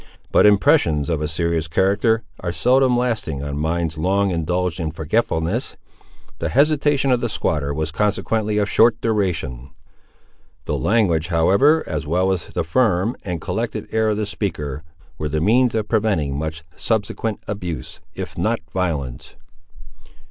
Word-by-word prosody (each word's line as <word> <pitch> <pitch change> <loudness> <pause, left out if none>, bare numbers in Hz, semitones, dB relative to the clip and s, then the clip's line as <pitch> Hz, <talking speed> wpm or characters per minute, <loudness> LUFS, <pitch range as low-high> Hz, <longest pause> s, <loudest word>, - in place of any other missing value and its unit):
But - - +6
impressions 80 -7 +3
of 80 -2 -1
a 75 - -1
serious 85 0 -1
character 100 +6 +2 0.2
are 90 - -3
seldom 125 +5 +3
lasting 110 - -1
on 70 0 -4
minds 80 0 -1
long 95 +3 +1
indulged 90 0 -1
in 80 -2 -2
forgetfulness. 85 - -1 0.6
The - - -1
hesitation 145 -1 +2
of 125 -1 +2
the 120 - -1
squatter 75 -8 -1
was 80 +2 -2
consequently 105 +2 0
of 105 -1 +2
short 115 +2 +4
duration. 85 - -1 1.0
The - - -1
language, 90 -8 +1
however, 100 - +3
as 75 -2 -4
well 90 +4 +2
as 90 -2 -2
the - - -2
firm 105 +3 +1
and 90 -3 -3
collected - - -3
air 110 0 +2
of 105 - 0
the 105 - -1
speaker, 75 -9 -4 0.4
were 75 0 -2
the 75 +1 -1
means 115 +7 +3
of 110 -2 -1
preventing 100 -12 0
much 80 +2 -4
subsequent 110 0 -2
abuse, 90 -6 -5 0.2
if - - -6
not 110 +7 0
violence. 75 -10 -3
90 Hz, 150 wpm, -21 LUFS, 80-110 Hz, 1.0 s, But